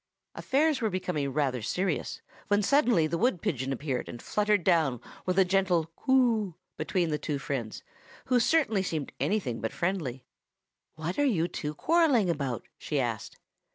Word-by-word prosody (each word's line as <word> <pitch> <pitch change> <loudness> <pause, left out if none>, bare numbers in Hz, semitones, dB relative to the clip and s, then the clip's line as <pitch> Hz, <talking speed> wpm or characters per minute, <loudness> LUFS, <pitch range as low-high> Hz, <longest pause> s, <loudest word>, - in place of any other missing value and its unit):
Affairs 290 +1 +1
were 220 - +1
becoming 180 -7 -2
rather 135 -3 0
serious, 180 - -2 0.3
when 205 +1 +2
suddenly 245 - +4
the 165 +2 -2
wood 235 -6 +2
pigeon 135 -4 -2
appeared, 135 -1 -3
and 120 - -7
fluttered 210 - +1
down 160 -9 +2 0.3
with 180 0 0
a 190 - +6
gentle 180 -3 +1
"Coo!" 235 -8 +2 0.2
between 175 -4 -1
the 150 - -1
two 150 -3 -2
friends, 135 -5 -4 0.4
who 250 -1 +3
certainly 240 -7 +3
seemed 160 -6 -3
anything 160 - -1
but 110 - -2
friendly. 155 -9 -2 0.7
"What 165 - -4
are - - +4
you 185 - +2
two 150 -3 -5
quarrelling 290 - +3
about?" 135 -7 -3
she - - -2
asked. - - -3
180 Hz, 155 wpm, -29 LUFS, 145-215 Hz, 0.7 s, a